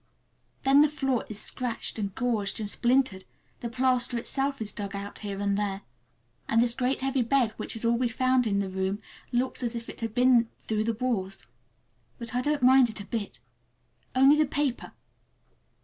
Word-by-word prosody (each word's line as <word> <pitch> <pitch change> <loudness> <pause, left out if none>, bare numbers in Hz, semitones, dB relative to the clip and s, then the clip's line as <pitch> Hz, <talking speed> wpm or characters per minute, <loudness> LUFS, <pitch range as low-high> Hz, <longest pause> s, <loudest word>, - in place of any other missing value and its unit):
Then 275 +2 +6
the 300 - +6
floor 270 -5 -1
is 215 -1 -5
scratched 235 -1 -2
and 200 -2 -3
gouged 225 -6 -1
and 215 - -3
splintered, 240 -3 +1 0.4
the 235 - -4
plaster 250 0 +1
itself 270 +3 -1
is 215 -2 -4
dug 200 -1 -5
out 200 +1 -6
here 200 -2 -5
and 200 0 +1
there, 200 -1 -2 0.6
and 225 - +3
this 235 0 +3
great 255 +1 -1
heavy 270 0 +1
bed, 245 -1 +2
which - - -4
is 225 - -3
all 235 0 +2
we 250 -2 +1
found 255 +1 +2
in 200 -2 +1
the 195 - -2
room, 190 +2 -1 0.3
looks 255 +2 -1
as 240 -1 -2
if 230 0 -5
it - - -10
had 225 -1 -4
been 245 -2 +4 0.2
through 215 0 0
the 230 - +1
wars. 210 -6 -2 0.7
But 235 -2 -8
I 250 - +1
don't 290 0 0
mind 255 -1 +6
it 220 - -8
a 200 - -7
bit—only 200 - -1
the 305 -1 +3
paper. 280 -3 -2
235 Hz, 185 wpm, -27 LUFS, 205-255 Hz, 0.7 s, Then